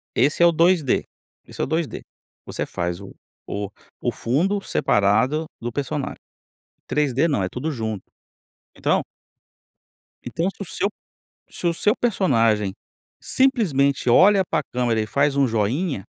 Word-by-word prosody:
Esse 145 Hz, +7 st, +2 dB
é -, -, +8 dB
o 170 Hz, -, +6 dB
2D, 165 Hz, -4 st, +2 dB, 0.4 s
esse -, -, -7 dB
é -, -, +2 dB
o -, -, -1 dB
2D. 160 Hz, -1 st, -2 dB, 0.4 s
Você -, -, -3 dB
faz 85 Hz, +1 st, -3 dB
o 100 Hz, -, -11 dB, 0.3 s
o 100 Hz, -1 st, -3 dB, 0.3 s
o -, -, 0 dB
fundo 185 Hz, -, 0 dB
separado 115 Hz, -, +2 dB, 0.2 s
do 120 Hz, +1 st, -3 dB
personagem. 140 Hz, +1 st, -3 dB, 0.6 s
O -, -, -50 dB
3D 150 Hz, +1 st, +1 dB
não, 120 Hz, -, 0 dB
é 90 Hz, -, -2 dB
tudo 150 Hz, +6 st, -3 dB
junto. 110 Hz, -6 st, -4 dB, 0.7 s
Então -, -, +1 dB, 1.2 s
então 170 Hz, +3 st, -1 dB
se 200 Hz, -, -12 dB
o -, -, -3 dB
seu 200 Hz, -, -1 dB, 0.6 s
se -, -, -6 dB
o 170 Hz, -, +3 dB
seu 210 Hz, +6 st, +2 dB
personagem 115 Hz, -, +2 dB, 0.5 s
simplesmente 155 Hz, -, +2 dB
olha 195 Hz, +9 st, +6 dB
para 150 Hz, -, -1 dB
câmera 120 Hz, -3 st, +1 dB
e 110 Hz, -, -3 dB
faz 140 Hz, +4 st, +1 dB
um 140 Hz, -2 st, +3 dB
joinha 120 Hz, -, 0 dB
140 Hz, 150 wpm, -23 LUFS, 115-170 Hz, 1.2 s, é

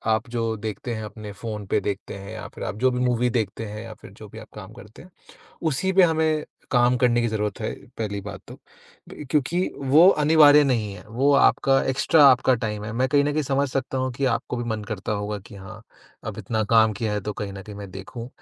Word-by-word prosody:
आप 110 Hz, +2 st, -5 dB
जो 115 Hz, -1 st, -2 dB
देखते 110 Hz, +3 st, -5 dB
हैं 110 Hz, -, -5 dB
अपने 105 Hz, 0 st, -8 dB
फ़ोन 105 Hz, -3 st, -5 dB
पे -, -, +1 dB
देखते 100 Hz, -1 st, -5 dB
हैं 100 Hz, +1 st, -9 dB
या 105 Hz, -5 st, -7 dB
फिर -, -, -7 dB
आप 90 Hz, -, -4 dB
जो 130 Hz, -, +5 dB
भी 125 Hz, -, -2 dB
मूवी 125 Hz, 0 st, +1 dB
देखते 110 Hz, +1 st, -4 dB
हैं 105 Hz, +1 st, -7 dB
या 115 Hz, -, -9 dB
फिर -, -, -12 dB
जो 110 Hz, -, -9 dB
भी 110 Hz, +2 st, -11 dB
आप -, -, -12 dB
काम 105 Hz, +1 st, -10 dB
करते 110 Hz, -3 st, -14 dB
हैं, 185 Hz, -, -15 dB, 0.5 s
उसी 160 Hz, +5 st, 0 dB
पे 190 Hz, 0 st, +5 dB
हमें 160 Hz, -2 st, +2 dB, 0.3 s
काम 125 Hz, 0 st, +4 dB
करने 120 Hz, -1 st, +2 dB
की 120 Hz, -, +1 dB
जरूरत 105 Hz, -2 st, -2 dB
है, 110 Hz, -, -2 dB, 0.3 s
पहली 100 Hz, -2 st, -3 dB
बात 100 Hz, -, -7 dB
तो। -, -, -9 dB, 0.5 s
ब 150 Hz, -, -9 dB
क्योंकि 150 Hz, +4 st, +1 dB, 0.2 s
वो 140 Hz, +5 st, +5 dB
अनिवार्य 150 Hz, -3 st, +6 dB
नहीं 115 Hz, -7 st, 0 dB
है, -, -, -11 dB
वो 135 Hz, +5 st, +2 dB
आपका 135 Hz, -1 st, +4 dB
एक्स्ट्रा 145 Hz, +3 st, +4 dB
आपका 130 Hz, -1 st, +5 dB
टाइम 105 Hz, -1 st, -3 dB
है, 105 Hz, -, -5 dB
मैं 130 Hz, +3 st, 0 dB
कहीं 145 Hz, 0 st, +3 dB
न 145 Hz, -, 0 dB
कहीं 155 Hz, -, 0 dB
समझ 140 Hz, 0 st, 0 dB
सकता 135 Hz, 0 st, -3 dB
हूँ 130 Hz, 0 st, -1 dB
कि 135 Hz, +3 st, -3 dB
आपको -, -, -4 dB
भी 120 Hz, -, -3 dB
मन 110 Hz, -1 st, -3 dB
करता 105 Hz, 0 st, -4 dB
होगा 105 Hz, 0 st, -3 dB
कि -, -, -12 dB
हाँ, 95 Hz, -1 st, -11 dB, 0.4 s
अब -, -, -6 dB
इतना 110 Hz, -1 st, -2 dB
काम 110 Hz, -1 st, +5 dB
किया 105 Hz, +1 st, -3 dB
है 105 Hz, -, -1 dB
तो 105 Hz, +2 st, -4 dB
कहीं 100 Hz, 0 st, -6 dB
न 95 Hz, 0 st, -8 dB
कहीं 105 Hz, 0 st, -10 dB
मैं 100 Hz, -1 st, -8 dB
देखूँ। 95 Hz, +6 st, -8 dB
115 Hz, 240 wpm, -24 LUFS, 105-135 Hz, 0.5 s, अनिवार्य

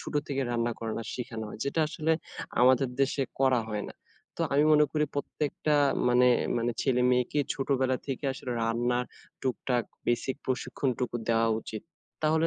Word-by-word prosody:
ছোট -, -, -7 dB
থেকেই 135 Hz, -2 st, -1 dB
রান্না 120 Hz, 0 st, 0 dB
করাটা 115 Hz, 0 st, -3 dB
শিখানো 115 Hz, -3 st, -5 dB
হয়। -, -, -9 dB
যেটা 140 Hz, +4 st, 0 dB
আসলে 155 Hz, +1 st, 0 dB, 0.5 s
আমাদের 130 Hz, +1 st, +5 dB
দেশে 135 Hz, 0 st, +2 dB, 0.2 s
করা 130 Hz, -3 st, +4 dB
হয় 105 Hz, -1 st, -2 dB
না। -, -, -10 dB, 0.4 s
তো -, -, -6 dB
আমি 145 Hz, +2 st, +4 dB
মনে 150 Hz, 0 st, +6 dB
করি 150 Hz, -1 st, +2 dB
প্রত্যেকটা 150 Hz, +1 st, -1 dB, 0.3 s
মানে 125 Hz, +1 st, +5 dB, 0.3 s
মানে 120 Hz, 0 st, 0 dB
ছেলে-মেয়েকে 125 Hz, +1 st, +2 dB, 0.2 s
ছোটবেলা 130 Hz, -1 st, +1 dB
থেকে 135 Hz, +1 st, -4 dB
আসলে 130 Hz, -, -7 dB
রান্নার 120 Hz, +2 st, +1 dB, 0.4 s
টুক-টাক 125 Hz, -2 st, 0 dB, 0.2 s
বেসিক 120 Hz, +3 st, 0 dB
প্রশিক্ষণটুকু 125 Hz, -1 st, -1 dB
দেওয়া 115 Hz, 0 st, +3 dB
উচিত। 110 Hz, -1 st, -7 dB, 0.4 s
তাহলে 160 Hz, +1 st, +3 dB
125 Hz, 150 wpm, -29 LUFS, 120-140 Hz, 0.5 s, মনে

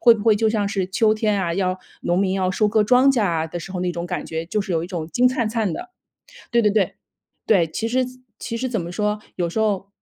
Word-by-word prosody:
会 235 Hz, -2 st, +7 dB
不 215 Hz, -, -5 dB
会 220 Hz, -2 st, +6 dB
就 220 Hz, +1 st, +2 dB
像 215 Hz, -2 st, 0 dB
是 195 Hz, -2 st, -1 dB
秋 215 Hz, +3 st, +2 dB
天 215 Hz, -1 st, +1 dB
啊， 170 Hz, -2 st, -1 dB
要 185 Hz, 0 st, 0 dB, 0.2 s
农 175 Hz, +1 st, 0 dB
民 195 Hz, -1 st, +1 dB
要 190 Hz, -1 st, 0 dB
收 210 Hz, +3 st, +2 dB
割 215 Hz, +1 st, +3 dB
庄 250 Hz, +5 st, +5 dB
稼 240 Hz, -, +1 dB
啊 165 Hz, -4 st, 0 dB
的 175 Hz, +2 st, -6 dB
时 195 Hz, -, -9 dB
候 180 Hz, -, -3 dB
那 180 Hz, -1 st, -1 dB
种 170 Hz, 0 st, -4 dB
感 180 Hz, -, -3 dB
觉， 160 Hz, +1 st, -4 dB
就 210 Hz, -, -1 dB
是 195 Hz, -, -4 dB
有 165 Hz, -1 st, +1 dB
一 170 Hz, -, -4 dB
种 170 Hz, -4 st, -4 dB
金 250 Hz, +9 st, +3 dB
灿 245 Hz, -3 st, -1 dB
灿 220 Hz, -3 st, 0 dB
的。 360 Hz, 0 st, -7 dB, 0.6 s
对 235 Hz, -1 st, +4 dB
对 210 Hz, -, +4 dB
对， 200 Hz, -2 st, +1 dB, 0.5 s
对， 190 Hz, -7 st, +4 dB
其 220 Hz, +8 st, -3 dB
实 255 Hz, +2 st, +1 dB, 0.3 s
其 230 Hz, -, -4 dB
实 255 Hz, +2 st, -2 dB
怎 225 Hz, -6 st, -1 dB
么 170 Hz, +1 st, -6 dB
说， 210 Hz, +2 st, 0 dB, 0.2 s
有 175 Hz, -2 st, 0 dB
时 220 Hz, -, -3 dB
候 205 Hz, -3 st, 0 dB
205 Hz, 290 characters per minute, -22 LUFS, 180-220 Hz, 0.6 s, 会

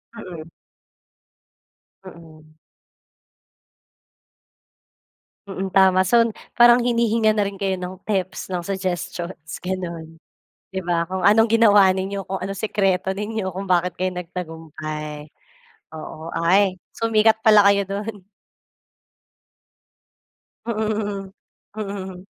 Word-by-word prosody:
Mm. 170 Hz, -7 st, -9 dB, 1.6 s
Mm. 155 Hz, -3 st, -14 dB, 2.9 s
Mm, 190 Hz, -1 st, -5 dB
tama. 190 Hz, -1 st, +5 dB
So 235 Hz, +1 st, +5 dB, 0.3 s
parang 240 Hz, 0 st, +7 dB
hinihingan 230 Hz, -2 st, +2 dB
na 205 Hz, -, +2 dB
rin 195 Hz, -1 st, -5 dB
kayo 195 Hz, -1 st, 0 dB
ng 185 Hz, 0 st, -7 dB
tips 190 Hz, -3 st, -2 dB
ng 180 Hz, -2 st, -3 dB
suggestions 175 Hz, -3 st, -4 dB
gano'n. 170 Hz, -3 st, -5 dB, 0.6 s
'Di 190 Hz, -, -4 dB
ba, 170 Hz, -1 st, +1 dB
kung 190 Hz, 0 st, 0 dB
anong 220 Hz, +2 st, +5 dB
ginawa 210 Hz, -4 st, +6 dB
ninyo, 195 Hz, +1 st, -2 dB
kung 195 Hz, -, -1 dB
anong 195 Hz, +1 st, -5 dB
sikreto 190 Hz, -3 st, +1 dB
ninyo, 210 Hz, 0 st, -3 dB
kung 190 Hz, +2 st, -6 dB
bakit 180 Hz, -1 st, +1 dB
kayo 185 Hz, 0 st, -1 dB
nagtagumpay, 155 Hz, -4 st, -6 dB, 0.6 s
oo. 160 Hz, +1 st, -8 dB
Ay 185 Hz, +3 st, +3 dB, 0.2 s
sumikat 220 Hz, -1 st, +2 dB
pala 210 Hz, -2 st, +6 dB
kayo 200 Hz, 0 st, +5 dB
do'n. 200 Hz, +1 st, -5 dB, 2.4 s
Mm, 210 Hz, -3 st, -2 dB, 0.4 s
mm. 195 Hz, -3 st, -6 dB
190 Hz, 100 wpm, -22 LUFS, 180-210 Hz, 2.9 s, parang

